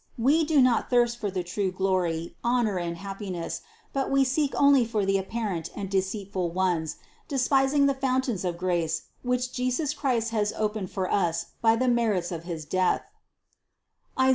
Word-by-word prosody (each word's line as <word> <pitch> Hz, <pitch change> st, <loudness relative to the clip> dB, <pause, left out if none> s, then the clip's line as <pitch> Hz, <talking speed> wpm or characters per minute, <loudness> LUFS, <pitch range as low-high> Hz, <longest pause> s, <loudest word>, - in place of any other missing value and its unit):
We 280 Hz, +8 st, +3 dB
do 300 Hz, -3 st, +4 dB
not 245 Hz, -3 st, +2 dB
thirst 240 Hz, -1 st, +2 dB
for 205 Hz, -, -1 dB
the 185 Hz, -2 st, -2 dB
true 190 Hz, +2 st, -2 dB
glory, 185 Hz, -3 st, -1 dB
honor 235 Hz, -5 st, +1 dB
and 170 Hz, -1 st, -3 dB
happiness, 195 Hz, -2 st, -5 dB, 0.3 s
but 270 Hz, -1 st, -1 dB
we 275 Hz, 0 st, +4 dB
seek 275 Hz, +2 st, +1 dB
only 280 Hz, -2 st, +5 dB
for 220 Hz, -3 st, -1 dB
the 195 Hz, 0 st, +2 dB
apparent 195 Hz, -4 st, -3 dB
and 195 Hz, -1 st, -5 dB
deceitful 190 Hz, -2 st, -1 dB
ones, 170 Hz, -3 st, 0 dB, 0.3 s
despising 270 Hz, +1 st, +3 dB
the 280 Hz, -, +3 dB
fountains 260 Hz, -6 st, 0 dB
of 175 Hz, -2 st, -2 dB
grace, 170 Hz, -3 st, 0 dB, 0.2 s
which 250 Hz, 0 st, -1 dB
Jesus 255 Hz, +4 st, 0 dB
Christ 235 Hz, -5 st, 0 dB
has 210 Hz, -2 st, 0 dB
opened 210 Hz, -3 st, -1 dB
for 185 Hz, -2 st, -2 dB
us 170 Hz, -4 st, 0 dB
by 225 Hz, -1 st, +5 dB
the 255 Hz, +3 st, 0 dB
merits 220 Hz, -8 st, +1 dB
of 170 Hz, -1 st, -5 dB
his 165 Hz, -3 st, -5 dB
Death 185 Hz, +4 st, +1 dB, 1.2 s
(Is. 260 Hz, 0 st, +5 dB
210 Hz, 165 wpm, -27 LUFS, 185-255 Hz, 1.2 s, only